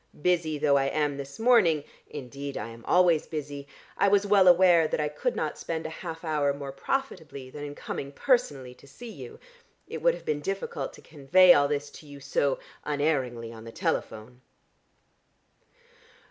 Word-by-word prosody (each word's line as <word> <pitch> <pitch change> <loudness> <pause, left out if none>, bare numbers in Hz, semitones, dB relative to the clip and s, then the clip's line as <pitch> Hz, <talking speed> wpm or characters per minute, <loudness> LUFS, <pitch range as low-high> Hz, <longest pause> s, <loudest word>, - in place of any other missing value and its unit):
Busy 165 -4 +1
though 140 -1 +3
I 135 - +1
am 145 0 0
this 140 0 -8
morning 220 - +4 0.3
(indeed 140 0 -7
I 105 - -5
am 115 0 -12
always 175 -3 +3
busy) 145 -2 -6 0.3
I - - +4
was 200 0 +3
well 200 -2 +5
aware 175 -2 +6
that - - -2
I 150 - +1
could 195 - -2
not 155 - -3
spend 160 -1 -4
a 160 - -4
half 165 0 -7
hour 150 -3 0
more 140 -1 -6
profitably 155 - -4
than 145 +1 -8
in 145 0 -7
coming 140 -1 -6
personally 145 - 0
to 140 - -19
see 230 - -10
you. - - -10 0.5
It - - -6
would - - +3
have - - -13
been 150 -1 -1
difficult 195 +5 -4
to - - -15
convey 165 +5 +5
all 145 0 +3
this 145 0 -3
to 155 - -14
you 145 -1 -11
so 140 0 0 0.3
unerringly 135 -6 -1
on 110 -1 -11
the 115 - -9
telephone." 115 +3 -3
150 Hz, 175 wpm, -27 LUFS, 140-175 Hz, 0.5 s, aware